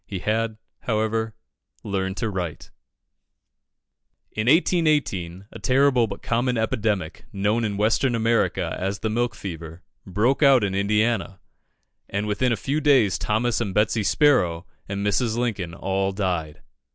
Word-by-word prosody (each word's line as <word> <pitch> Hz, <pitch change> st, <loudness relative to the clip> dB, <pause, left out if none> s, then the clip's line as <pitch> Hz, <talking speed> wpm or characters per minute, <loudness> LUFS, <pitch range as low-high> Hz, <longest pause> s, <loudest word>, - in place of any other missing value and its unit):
He 100 Hz, -, -4 dB
had, 110 Hz, +3 st, -1 dB, 0.2 s
however, 110 Hz, -1 st, -1 dB, 0.5 s
learned 95 Hz, -1 st, -2 dB
to 115 Hz, -, -1 dB
write. 90 Hz, -5 st, -5 dB, 1.6 s
In 110 Hz, +2 st, -3 dB
1818, 145 Hz, -, +2 dB
a -, -, -10 dB
terrible 130 Hz, -2 st, +3 dB
but 100 Hz, -, -8 dB
common 120 Hz, +1 st, 0 dB
epidemic, 105 Hz, -6 st, -1 dB
known 105 Hz, +4 st, 0 dB
in 105 Hz, -2 st, -2 dB
Western 115 Hz, +4 st, +2 dB
America 115 Hz, 0 st, +1 dB
as 95 Hz, +1 st, -3 dB
the 110 Hz, -, -1 dB
milk 120 Hz, +1 st, 0 dB
fever, 85 Hz, -3 st, -8 dB, 0.2 s
broke 110 Hz, -, +1 dB
out 135 Hz, -5 st, +6 dB
in 100 Hz, -1 st, -1 dB
Indiana, 105 Hz, 0 st, 0 dB, 0.7 s
and 100 Hz, +1 st, -2 dB
within 105 Hz, +4 st, 0 dB
a 115 Hz, -, +1 dB
few 145 Hz, +3 st, -1 dB
days 130 Hz, -, +4 dB
Thomas 115 Hz, +3 st, 0 dB
and 100 Hz, -5 st, -3 dB
Betsy 105 Hz, +1 st, +2 dB
Sparrow 100 Hz, -, +2 dB, 0.2 s
and 100 Hz, +1 st, -3 dB
Mrs. 110 Hz, +2 st, +1 dB
Lincoln 100 Hz, -8 st, -2 dB
all 95 Hz, +1 st, -1 dB
died. 90 Hz, -6 st, -3 dB
110 Hz, 140 wpm, -24 LUFS, 95-120 Hz, 1.6 s, out